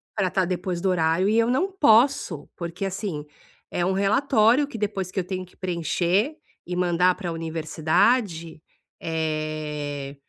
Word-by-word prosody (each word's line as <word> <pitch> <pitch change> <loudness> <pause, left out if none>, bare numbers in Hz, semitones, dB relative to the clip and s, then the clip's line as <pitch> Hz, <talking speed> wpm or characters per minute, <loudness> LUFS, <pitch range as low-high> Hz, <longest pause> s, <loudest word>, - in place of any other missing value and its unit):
pra 190 -4 0
tá 190 0 +1
depois 180 0 -3
do 190 - +1
horário 170 +2 +2
e 220 - +2
eu 230 0 +4
não 320 +11 +1
posso, 245 - +3
porque, 170 +2 -5
assim, 195 -5 -4 0.5
é 175 - -1
um 190 - +1
relatório 230 +5 +3
que 260 - -8
depois 200 -3 -2
que 190 - -2
eu - - -1
tenho 185 0 -5
que 180 - -23
preencher 180 - 0 0.3
e 180 - -4
mandar 180 0 +3
para 180 -1 -5
a - - -2
universidade 165 +3 0 0.4
eh, 155 -3 -3
180 Hz, 160 wpm, -24 LUFS, 165-210 Hz, 0.5 s, eu